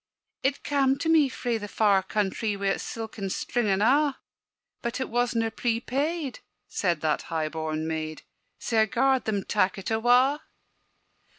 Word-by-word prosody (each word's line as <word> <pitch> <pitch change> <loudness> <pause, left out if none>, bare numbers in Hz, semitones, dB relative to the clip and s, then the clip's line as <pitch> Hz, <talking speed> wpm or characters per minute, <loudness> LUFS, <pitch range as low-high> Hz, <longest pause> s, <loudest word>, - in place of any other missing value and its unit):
"It 270 +1 0
cam' 275 -2 +2
to 320 +3 -2
me 310 -4 +5
frae 240 -3 -2
the 205 - -6
far 205 -2 +3
countrie 205 +2 -1
Wi' 200 0 0
its - - -1
silken 220 -3 -5
string 240 +4 -1
and 195 +1 +2
a'; 280 +3 +3 0.6
But 235 +2 -3
it 260 - -2
wasna 235 -1 +1
prepaid," 265 +6 -1 0.3
said 175 -5 -1
that 155 -1 +1
high 160 -2 -1
born 155 0 -3
maid, 155 -1 -4 0.3
"Sae 225 -2 +1
I - - +5
gar'd 260 +3 +2
them 205 -3 -1
tak' 195 -2 +1
it 195 +3 -5
awa'." 245 +6 +4
225 Hz, 160 wpm, -27 LUFS, 195-260 Hz, 0.6 s, me